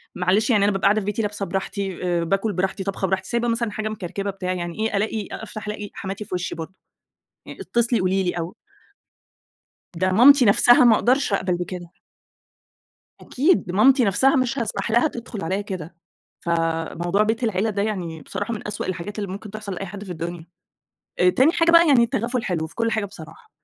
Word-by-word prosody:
معلش 185 +6 +1
يعني 210 -5 +4
أنا 205 - +3
بابقى 195 0 -2
قاعدة 205 +2 +4
في 195 - -7
بيتي 210 +2 -1
لابسة 205 -1 -3
براحتي 195 -1 -4
آآ 175 -1 0
باكل 195 +5 0
براحتي، 190 +2 -2
طابخة 195 0 -2
براحتي، 190 0 -2
سايبة 235 0 0
مثلًا 230 -2 0
حاجة 215 0 -3
مكركبة 200 -1 -4
بتاع، 185 -2 -3
يعني 175 +1 -5
إيه 220 -2 0
ألاقي 215 0 -2
أ - - -6
أفتح 215 -1 -8
ألاقي 210 -1 -5
حماتي 195 +2 -6
في 190 - -4
وشّي 180 -1 -3
برضه، 165 +3 -7 0.7
يعني - - -9
اتصلي 235 0 +1
قولي 190 +1 +1
لي 180 - 0
أو 170 0 -5 1.4
ده 185 +2 +1
مامتي 260 +6 +7
نَفْسها 240 +4 +6
ما 235 -2 +7
أقدرش 255 +1 +1
أقبل 185 -2 +1
بكده. 175 -1 -6 1.3
أكيد 315 +8 +1
دي 175 - -6
مامتي 255 +6 +5
نَفْسها 245 +8 +3
مش 260 +1 0
هاسمح 220 -2 -2
لها 240 +7 +3
تدخُل 235 - -7
عليّا 190 +5 -1
كده، 185 -5 -6 0.5
فموضوع 170 +3 0
بيت 225 +3 0
العيلة 220 0 0
ده 200 -1 -1
يعني 175 -7 -4
بصراحة 205 +8 -4
من 210 - -7
أسوأ 210 - -4
الحاجات 190 +3 -5
اللي 200 -2 -3
ممكن 200 +2 -7
تحصل 210 -2 -6
لأي 195 +2 -5
حد 200 +2 -8
في 185 - -6
الدنيا، 170 0 -6 0.7
آآ 180 0 +5
تاني 265 - +4
حاجة 335 -1 +3
بقى 335 0 +7
يعني 260 -4 +6
التغافل 240 0 -2
حلو 170 -6 -1
في 160 - -16
كل 230 -1 0
حاجة 220 -2 -1
بصراحة 180 - -12
200 Hz, 200 wpm, -23 LUFS, 185-225 Hz, 1.4 s, مامتي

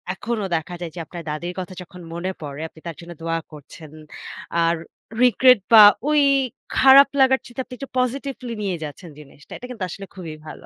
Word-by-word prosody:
এখনো 230 +1 -3
দেখা 165 +2 -4
যায় 170 -2 -5
যে 175 - -6
আপনার 170 +1 -9
দাদীর 170 +4 -4
কথা 185 0 -6
যখন 180 0 -12
মনে 175 +3 -3
পড়ে 145 0 -7
আপনি 160 - -18
তার 165 - -6
জন্য 170 0 -11
দোয়া 165 0 -1
করছেন। 150 +1 -13 0.7
আর 165 0 +2 0.5
regret 250 0 +6
বা 215 -1 +11 0.3
ওই 300 -1 +4 0.6
খারাপ 270 +1 +8
লাগার 265 0 +5
চাইতে 240 +2 -11
আপনি 250 - -13
একটু 275 - -8
positively 255 -1 -3
নিয়ে 190 -3 -1
যাচ্ছেন 155 +3 -8
জিনিসটা। 145 0 -17
এটা - - -10
কিন্তু 220 -6 -6
আসলে 195 +4 -8
খুবই 165 -5 -8
ভালো। - - -10
180 Hz, 185 wpm, -22 LUFS, 165-250 Hz, 0.7 s, বা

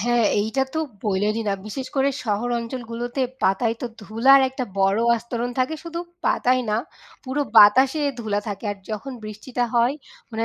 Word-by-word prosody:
হ্যাঁ, 240 0 +2 0.2
এইটা 220 +6 0
তো - - 0 0.3
বইলেইনি 210 +2 0
না। - - +2
বিশেষ 260 +5 -5
করে 270 +1 +3 0.2
শহর 215 +3 -1
অঞ্চলগুলোতে 240 +1 -5 0.2
পাতায় 225 +4 +2
তো - - -1
ধুলার 230 +7 +5
একটা 260 -1 -4
বড় 195 +2 +3 0.2
আস্তরণ 235 +1 -4
থাকে। 260 +5 +1
শুধু 335 0 -5 0.3
পাতায় 255 0 +2
না, 210 - +2 0.5
পুরো 260 +3 -2 0.2
বাতাসে 260 +8 +7 0.2
ধুলা 215 -3 -1
থাকে। 200 +1 -6
আর 205 - -11
যখন 255 +6 -5
বৃষ্টিটা 225 +4 -3
হয় 240 +3 +3 0.4
মানে 225 +1 -1
235 Hz, 160 wpm, -23 LUFS, 215-260 Hz, 0.5 s, বাতাসে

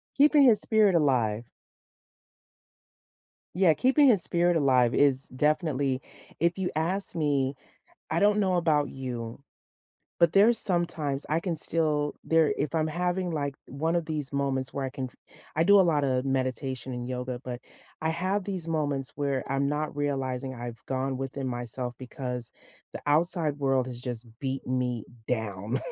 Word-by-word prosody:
Keeping 290 0 +6
his 230 -5 +5
spirit 215 -4 +4
alive. 120 -8 +2 2.1
Yeah, 180 -4 +5
keeping 270 - +4
his 205 -8 +4
spirit 175 0 +2
alive 130 -4 +3
is 140 -2 +3
definitely 140 -2 0 0.4
If 170 +3 +2
you 185 -2 -1
ask 180 +6 -1
me, 140 -3 +1 0.6
I 165 - +1
don't 210 +1 +4
know 190 -3 +2
about 155 -4 +2
you, 120 -2 -6 0.8
but 170 -1 +4
there's 215 +4 +6
some 175 -4 +1
times 145 -4 -3
I 155 - +2
can 170 -1 -2
still 150 -2 0
there 160 -2 +3
if 150 +3 -2
I'm 155 0 +1
having, 180 +2 -1
like, 140 -3 -2
one 160 +5 -1
of 170 -2 0
these 150 -4 -4
moments 135 -2 -1
where 135 -1 -2
I - - -3
can 130 0 -4
f 125 - -11 0.4
I 160 - +3
do 200 +2 +7
a - - +8
lot 155 -4 +2
of 130 -1 +1
meditation 130 0 -2
and 120 0 -5
yoga, 125 -1 -4
but 125 -1 -5 0.4
I 160 - +1
have 185 +4 -1
these 185 -4 -4
moments 145 -4 -1
where 140 -2 -1
I'm 140 +1 +1
not 150 +1 -2
realizing 135 -2 -2
I've 120 -1 -7
gone 130 0 -1
within 135 0 -4
myself 120 0 -4
because 125 -1 -5 0.4
the - - -6
outside 155 0 +1
world 135 -2 +2
has 125 -1 -7
just 125 -2 -5
beaten 130 -1 -2
me 125 -3 -2 0.2
down, 110 0 -2
145 Hz, 160 wpm, -28 LUFS, 130-170 Hz, 2.1 s, a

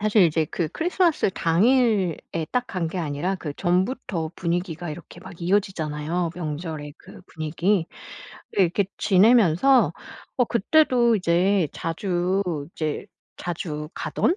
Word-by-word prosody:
사실 215 0 +4
이제 160 -1 +2
그 170 -3 -1
크리스마스 345 - +1
당일에 190 - +1
딱 250 -1 0
간 175 -3 -2
게 180 +3 -5
아니라 165 +4 -2
그 155 -5 -5
전부터 180 -3 -1
분위기가 175 -1 -3
이렇게 170 +2 -10
막 190 -1 -11
이어지잖아요 170 -3 -1
명절의 155 -3 -5
그 - - -14
분위기. 165 +4 0 0.7
이렇게 190 0 +2
지내면서 215 +4 +4 0.4
어 250 - +4
그때도 240 0 +3
이제 180 -1 +2
자주 180 +3 -1 0.3
이제 155 +4 -3 0.3
자주 155 -3 -5
가던 350 - 0
180 Hz, 270 characters per minute, -24 LUFS, 165-205 Hz, 0.7 s, 사실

